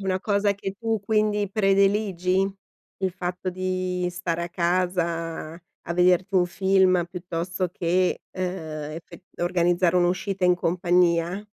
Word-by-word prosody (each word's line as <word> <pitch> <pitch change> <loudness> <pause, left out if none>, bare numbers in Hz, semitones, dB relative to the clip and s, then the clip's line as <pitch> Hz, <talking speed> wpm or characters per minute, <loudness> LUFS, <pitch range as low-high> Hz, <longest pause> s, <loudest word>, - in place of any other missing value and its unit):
Una 190 -1 -1
cosa 205 -1 +1
che 195 -1 -5
tu 225 -2 -1
quindi 210 -1 +1
prediligi? 195 -2 +2 0.5
Il 190 -1 0
fatto 180 +1 -4
di 185 0 -2
stare 170 -1 -2
a - - -6
casa, 170 -2 -1
a 170 0 -10
vederti 180 +2 +3
un 180 -1 +4
film 185 0 +3
piuttosto 180 +1 -3
che, 180 +1 0
uhm, 185 - -3 0.6
effe 180 - -15 0.2
organizzare 175 0 +2
un'uscita 185 +2 0
in 180 0 +5
compagnia? 175 +1 +1
180 Hz, 125 wpm, -25 LUFS, 175-195 Hz, 0.6 s, in